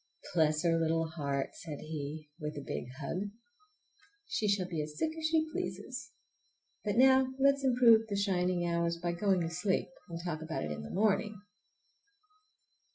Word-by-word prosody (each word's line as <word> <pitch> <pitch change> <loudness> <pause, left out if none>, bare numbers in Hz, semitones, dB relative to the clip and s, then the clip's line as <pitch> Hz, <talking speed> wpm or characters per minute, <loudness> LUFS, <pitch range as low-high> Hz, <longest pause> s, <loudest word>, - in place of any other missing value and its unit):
"Bless 155 -2 +3
her 165 -1 +3
little 165 0 +1
heart!" 140 -4 -2
said 150 -4 -7
he 155 0 -6
with 150 -1 -4
a 145 - -5
big - - -3
hug; 185 +7 -3 1.0
"she 215 - -1
shall 200 -3 +2
be 165 -4 -2
as 150 0 -6
sick 315 - 0
as 320 -1 -1
she 320 0 +2
pleases! - - -4 0.7
But 205 -1 -1
now 260 +1 +6
let's 275 0 +4
improve 240 -4 +6
the 205 - -2
shining 180 -3 +1
hours 170 0 0
by 175 0 -1
going 185 +1 +2
to 165 - -1
sleep, 185 +3 0 0.2
and 165 0 -5
talk 160 -3 -3
about 160 - -3
it 75 - -3
in 75 0 -4
the 75 - -8
morning!" 210 0 +1
175 Hz, 165 wpm, -32 LUFS, 155-210 Hz, 1.0 s, now